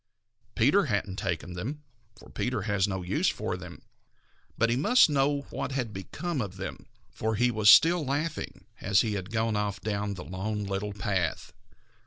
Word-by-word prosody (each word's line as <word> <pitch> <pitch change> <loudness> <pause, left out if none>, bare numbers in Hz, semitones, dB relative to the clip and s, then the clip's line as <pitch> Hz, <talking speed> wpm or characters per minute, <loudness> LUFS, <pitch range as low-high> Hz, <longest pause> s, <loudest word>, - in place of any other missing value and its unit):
Peter 145 - +4
hadn't 100 -6 -2
taken 90 -2 -3
them, 130 +13 -5 0.3
for - - -15
Peter 125 -5 -2
has 100 -2 +1
no 95 -2 -3
use 90 - +1
for - - -3
them, - - -10 0.7
but 115 +1 +2
he - - +2
must 155 - +5
know 140 0 +2
what 135 - -3
had 125 -5 -2
become 140 - -4
of 95 -3 -5
them, 95 - -7 0.2
for 110 0 -2
he 120 +3 +2
was 110 -2 +4
still 165 +9 +7
laughing 145 +4 -3
as 100 +1 +3
he 110 -2 -1
had 95 -2 -4
gone 110 -1 0
off 105 -1 -1
down 105 -1 -2
the 90 - -8
Lone 105 +3 -3
Little 100 +1 -3
Path. 95 -4 -2
105 Hz, 175 wpm, -28 LUFS, 100-130 Hz, 0.7 s, still